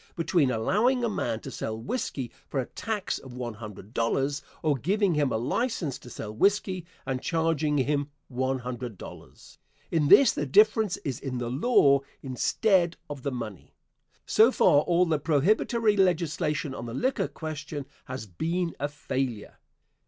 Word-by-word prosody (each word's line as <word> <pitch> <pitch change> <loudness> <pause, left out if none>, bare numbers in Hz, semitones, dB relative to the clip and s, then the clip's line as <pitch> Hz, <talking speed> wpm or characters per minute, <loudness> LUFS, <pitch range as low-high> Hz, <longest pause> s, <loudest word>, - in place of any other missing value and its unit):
_, - - -38
between 165 -4 +2
allowing 215 - +2
a - - +2
man 190 - -2
to - - -8
sell 110 0 -4
whiskey 130 - -3 0.2
for 140 - -2
a 130 - -1
tax 210 - -3
of 130 -2 -11
one 120 -2 -4
hundred 105 -1 -10
dollars 135 +5 0 0.2
or 155 -2 +3
giving 190 - +1
him 145 -3 +1
a - - +1
license 155 - -1
to 125 - -12
sell 110 -2 -7
whiskey 185 - +1 0.2
and 130 -1 -2
charging 160 -3 +1
him 145 +1 +1 0.2
one 130 +1 -1
hundred 125 -3 -6
dollars. - - -12 0.3
In 155 -3 +2
this, 275 - +8
the 145 - -3
difference 215 +4 +4
is 135 -5 -2
in 130 -2 -4
the 120 -1 -3
law 140 - +4 0.2
instead 170 - +1
of 145 -2 -6
the 140 - -2
money. 115 -7 -7 0.5
So 225 +4 +5
far 145 - +5
all 175 +3 +3
the 160 -3 +1
prohibitory 210 - +2
legislation 165 -6 +1
on 120 - -6
the 115 - -6
liquor 260 - 0
question 155 -2 -6 0.2
has 130 -2 -6
been 165 - -2
a 145 - 0
failure. 130 -6 -4
145 Hz, 165 wpm, -27 LUFS, 125-180 Hz, 0.5 s, this